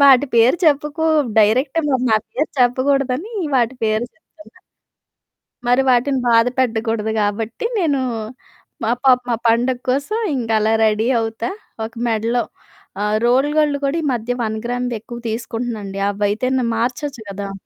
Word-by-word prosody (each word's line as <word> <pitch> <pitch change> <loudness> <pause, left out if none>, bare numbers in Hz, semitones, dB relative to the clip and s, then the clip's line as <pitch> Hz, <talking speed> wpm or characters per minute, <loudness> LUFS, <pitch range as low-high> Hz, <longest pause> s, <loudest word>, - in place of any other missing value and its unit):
వాటి 275 0 +7
పేరు 235 +8 +5
చెప్పుకు 300 +1 +1 0.3
డైరెక్ట్ 255 +9 +3
మరి 260 -2 +1
నా 220 - +5
పేరు 300 +3 -1
చెప్పకూడదని 270 - +1 0.2
వాటి 240 +1 +1
పేరు 215 +2 +1
చెప్తున్న. 320 +2 -20 1.1
మరి 245 +2 +4
వాటిని 255 +2 +2
బాధ 230 0 +5
పెట్టకూడదు 225 -2 0
కాబట్టి 215 - -2
నేనూ, 305 -7 +1 0.8
మా 225 - +1
పాపం 250 -1 +4
ఆ - - -9
పండగ 240 +2 +2
కోసం 280 - 0 0.2
ఇంక 240 -4 -3
అలా 220 +1 +2
రెడీ 220 +2 +1
అవుతా. 225 +1 -3 0.4
ఒక 225 - -9
మెడలో 230 +2 0 0.6
ఆహ్, 210 +1 +1
రోల్ 260 +4 +3
గోల్డ్ 295 -2 +3
కూడా 280 +4 0
ఈ - - -6
మధ్య 235 0 -3
వన్ 220 0 -2
గ్రామ్‌ది 245 0 -2
ఎక్కువ 235 +2 -9
తీసుకుంటున్నాండి. 225 -3 -4
అవైతేను 215 +6 0
మార్చొచ్చు 250 +3 -2
గదా! 200 0 -5
245 Hz, 140 wpm, -19 LUFS, 225-270 Hz, 1.1 s, వాటి